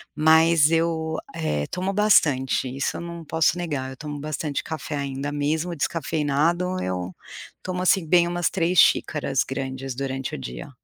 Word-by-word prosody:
mas 160 0 +5
eu, 160 -1 0 0.2
eh, 75 - -1
tomo 185 +2 -2
bastante, 145 -11 +3
isso 135 - -1
eu - - -6
não 170 -1 -7
posso 160 +2 +2
negar. 145 -7 -3
Eu 130 - -10
tomo 150 0 -6
bastante 150 0 -3
café 155 -1 -5
ainda, 140 0 -3
mesmo 155 +4 -1
o - - -4
descafeinado, 165 +4 0
eu 90 0 -3 0.5
tomo, 180 0 -3
assim, 185 -2 +3
bem 175 +1 +4
umas 175 -1 0
3 180 -1 +1
xícaras 140 -4 +3
grandes 135 0 -4
durante 135 0 -3
o - - -5
dia. 60 -2 -7
155 Hz, 160 wpm, -24 LUFS, 135-170 Hz, 0.5 s, mas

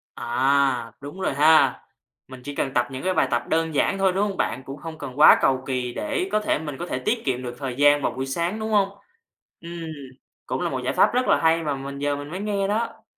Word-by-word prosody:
À, 130 0 +1
đúng 145 +7 -8
rồi 190 - 0
ha. 145 -2 +4 0.5
Mình 130 -1 -11
chỉ 145 +1 -7
cần 135 - -2
tập 120 - +1
những 130 0 -6
cái 185 0 +1
bài - - +2
tập - - +1
đơn 160 -1 0
giản 195 - +1
thôi, 190 -1 +2
đúng 200 +3 +1
hông 195 - -5
bạn? 125 +3 -2
Cũng 135 +2 -8
không 160 +3 -8
cần 135 -2 -8
quá 150 - +9
cầu 130 -1 +2
kỳ 125 -2 -2
để 180 - -2
có 215 - +2
thể 210 - 0
mình 150 -3 -6
có 175 - -5
thể - - -3
tiết 225 +2 -1
kiệm 130 -2 -1
được 120 -1 -6
thời 135 -3 -4
gian 145 +1 +4
vào 120 - 0
buổi 130 +2 -4
sáng, 170 +9 -2
đúng 220 0 -3
hông? 200 -2 +3 0.7
Ừm, 170 0 -7 0.6
cũng - - -3
là - - 0
một - - -3
giải - - -1
pháp - - +4
rất 250 +1 +1
là - - +4
hay 165 0 +3
mà 145 -2 -1
mình 140 +1 -7
giờ 145 0 0
mình 145 +1 -7
mới 185 - -5
nghe 200 -1 -1
đó. 220 +3 -2
145 Hz, 255 wpm, -24 LUFS, 135-185 Hz, 0.7 s, quá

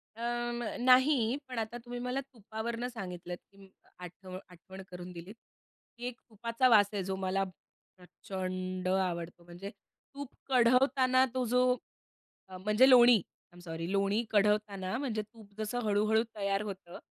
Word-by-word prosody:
अ, 230 - -10 0.4
म - - -4 0.2
नाही 260 +4 +6 0.3
पण 250 -3 -4
आता 225 +2 -4
तुम्ही 245 0 -5
मला 250 +2 -2
तुपावरनं 230 +2 -4
सांगितलत, 180 -7 -6
की 200 - -23
म 195 -1 -15 0.4
आठ 180 +2 -11 0.2
आठवण 190 +2 -12
करून 180 0 -8
दिलीत, 180 +4 -10 0.6
की 240 - -6
एक 250 -1 -7
तुपाचा 230 +3 +1
वास 205 -4 +6
आहे 200 -2 -1
जो 190 +1 -2
मला 190 0 0 0.5
प्रचंड 185 0 -5
आवडतो. 175 -2 -1
म्हणजे 175 +3 -8 0.4
तूप 280 -1 -7 0.2
कढवताना 255 +1 +4
तो 255 -1 0
जो 250 +2 +3 0.9
अ, 185 - -9
म्हणजे 210 +7 +4
लोणी. 245 -1 +8 0.4
आय - - -18
एम - - -13
सॉरी, 165 +1 -5
लोणी 200 +3 +1
कढवताना 205 -2 +1
म्हणजे 235 -6 -2
तूप 215 -1 -17
जसं 215 +3 -2
हळू-हळू 215 +1 +3
तयार 200 0 0
होतं, 190 -4 -7
210 Hz, 150 wpm, -31 LUFS, 185-240 Hz, 0.9 s, लोणी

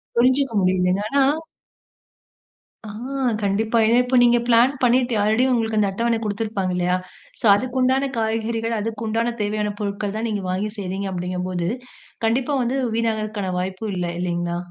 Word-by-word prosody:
புரிஞ்சுக்க 260 +1 +3
முடியுதுங்க. 185 +1 +2
ஆனா 275 -1 +3 1.6
அ - - -7 0.5
கண்டிப்பா, 215 +3 +1
இத 230 - +4
இப்ப 250 +1 +1
நீங்க 240 0 +5
பிளான் 240 +3 +5
பண்ணிட்டு 245 0 +3
ஆல்ரெடி 220 +4 +3
உங்களுக்கு 225 -3 0
அந்த 205 -2 +2
அட்டவண 230 +3 0
கொடுத்திருப்பாங்க 205 -3 -2
இல்லயா? 180 0 +1 0.4
சோ - - -4
அதுக்கு 255 +4 -2
உண்டான 265 +2 +2
காய்கறிகள், 225 +1 -1
அதுக்கு 225 +1 -4
உண்டான 230 +2 0
தேவையான 210 0 -1
பொருட்கள் 200 0 -3
தான் 225 +1 -2
நீங்க 205 -2 -2
வாங்கி 200 +3 -1
செய்கிறீங்க, 195 0 -3
அப்டிங்கும் 180 0 -3
போது, 175 -2 -2 0.6
கண்டிப்பா 255 +5 +1
வந்து 245 +3 -1 0.2
வீணாகறக்கான 215 -4 -1
வாய்ப்பும் 190 +3 -4
இல்ல 175 -1 -2
இல்லைங்களா? 175 -1 -2
220 Hz, 145 wpm, -22 LUFS, 195-235 Hz, 1.6 s, நீங்க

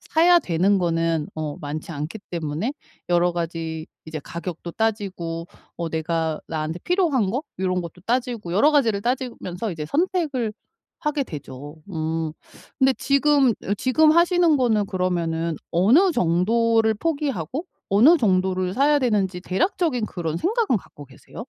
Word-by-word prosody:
사야 345 +2 +4
되는 190 - +2
거는 165 -3 0
어 155 -2 -3
많지 150 +3 -5
않기 155 +8 -5
때문에 165 - -3 0.4
여러 175 0 +3
가지 165 -2 -4 0.2
이제 155 0 -5
가격도 170 +2 -7
따지고 190 -7 -2 0.3
어 170 -1 -3
내가 160 0 -1
나한테 160 +1 -3
필요한 320 - +1
거 260 +8 -2 0.2
요런 185 -1 0
것도 170 +1 -9
따지고 235 -7 -1
여러 285 +11 +4
가지를 225 -9 +2
따지면서 235 -5 -3
이제 155 -4 -5
선택을 295 - 0 0.5
하게 300 -2 0
되죠. 145 - -8 0.2
음 160 -1 -2 0.5
근데 265 0 +4
지금 280 -1 +3
어 200 - 0
지금 305 +8 +4
하시는 340 -1 +4
거는 225 -5 +2
그러면은 170 -3 -1 0.2
어느 240 - +5
정도를 220 - +2
포기하고 280 - -2 0.2
어느 240 - +6
정도를 185 -3 +1
사야 290 +2 +4
되는지 200 -8 0
대략적인 250 - 0
그런 165 -3 -4
생각은 420 - +1
갖고 145 -6 -10
계세요? 135 -1 -18
190 Hz, 310 characters per minute, -23 LUFS, 165-265 Hz, 0.5 s, 어느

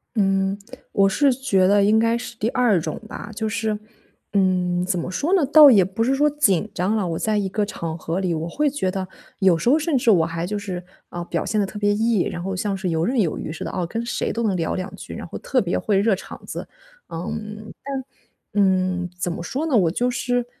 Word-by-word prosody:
嗯， 195 -1 +1 0.3
我 195 -1 +4
是 275 +7 +3
觉 195 -8 +2
得 200 0 +4
应 210 +2 +4
该 230 +1 +3
是 235 0 -7
第 225 +1 0
二 235 -9 +3
种 155 -1 -4
吧。 220 - -8
就 220 0 -2
是， 215 0 -1 0.5
嗯， 180 -2 +2
怎 185 -2 -1
么 170 - -4
说 300 - -1
呢？ 345 -7 +4
倒 295 0 +9
也 195 -5 +6
不 210 +4 -2
是 260 +3 +2
说 295 +2 +3
紧 220 - +1
张 195 +5 +1
了， 195 -4 0
我 165 -1 -2
在 215 -1 +1
一 200 - 0
个 205 +2 -1
场 165 -5 -5
合 165 +2 -3
里， 185 -3 0
我 165 +1 -3
会 295 - +1
觉 225 -10 -1
得， 190 -1 -3 0.3
有 185 -4 +4
时 235 - +1
候 300 +5 +5
甚 310 -2 +1
至 240 -2 +4
我 165 -5 +4
还 165 +1 -3
就 205 +2 -3
是， 185 -3 -5 0.3
嗯， 175 0 -5
表 170 - -1
现 215 -1 +1
得 - - +1
特 210 +2 -7
别 205 0 +2
E， 220 -3 +2
然 175 - -5
后 195 - -3
像 195 +1 -1
是 190 -2 -3
游 165 +1 0
刃 245 -1 +2
有 165 - -1
余 155 - -5
似 160 - -6
的， - - -4
哦， 180 -2 -2
跟 230 +5 -3
谁 - - -2
都 235 - -2
能 195 -4 +1
聊 165 - -1
两 185 0 -5
句， - - -9
然 - - -6
后 - - -7
特 255 - 0
别 175 -2 -1
会 205 -2 +1
热 205 +1 +3
场 190 - -7
子。 - - -6 0.4
嗯， 210 +5 -6
但 275 -1 -4 0.5
嗯， 185 -3 +1
怎 175 -1 -2
么 170 - -5
说 275 - -3
呢？ 275 -8 +2
我 175 -5 +4
就 245 +6 0
是 245 0 -1
200 Hz, 260 characters per minute, -22 LUFS, 180-230 Hz, 0.5 s, 倒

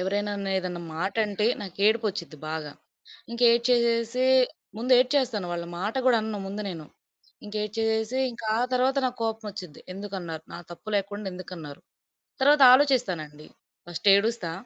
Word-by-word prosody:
ఎవరేనా 205 +2 -1
అన్నా 195 -1 -3
ఏదన్నా 180 -2 -5
మాటంటే, 205 +3 0 0.2
నాకేడుపొచ్చిద్ది 200 -4 -1
బాగా. 155 -2 -4 0.6
ఇంకేడ్చేసేసి 235 0 +2 0.5
ముందు 245 +4 0
ఏడ్చేస్తాను. 250 -6 +1
వాళ్ళ 170 0 -3 0.2
మాట 210 +4 -2
కూడా 245 -2 +6
అనను 215 -1 -4
ముందు 200 +2 -5
నేను. 160 -3 -8 0.6
ఇంక 205 - -9
ఏడ్చేసేసి, 220 +3 -1
ఇంక 235 - -11 0.2
ఆ - - +1
తర్వాత 255 +2 +2
నాకు 250 -1 -5
కోపం 225 0 -3
వచ్చిద్ది. 180 -6 -9
ఎందుకన్నారు? 185 -5 -6
నా - - -6
తప్పు 195 +6 -12
లేకుండా, 205 +1 -3
ఎందుకన్నారు? 170 -5 -9 0.6
తరవాత 285 +1 +6
ఆలోచిస్తానండి. 185 - +1 0.4
ఫస్ట్ 175 +3 -5
ఏడుస్తా. 200 -4 0
210 Hz, 130 wpm, -26 LUFS, 180-235 Hz, 0.6 s, కూడా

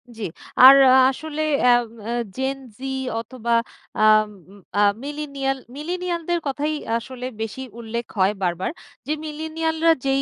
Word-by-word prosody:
জি। 220 - -7 0.4
আর 265 +2 +11 0.3
আসলে 310 +3 -5 0.2
অ্যাম 245 -1 +5 0.2
অ্যা 235 - -2 0.2
Gen 265 +1 -2 0.2
Z - - -28 0.4
অথবা 235 0 -3 0.5
আম 215 0 +5 0.5
আ - - +3 0.2
millennial 280 -2 -3 0.2
মিলেনিয়ালদের 345 +2 -2
কথাই 290 +3 -1 0.2
আসলে 250 +1 -7 0.2
বেশি 225 +4 -4 0.2
উল্লেখ 235 +1 -4
হয় 190 +2 +4
বারবার 175 +1 -1 0.4
যে - - -1
মিলেনিয়ালরা 320 +1 0
যেই 270 0 +2
270 Hz, 125 wpm, -22 LUFS, 235-310 Hz, 0.5 s, আর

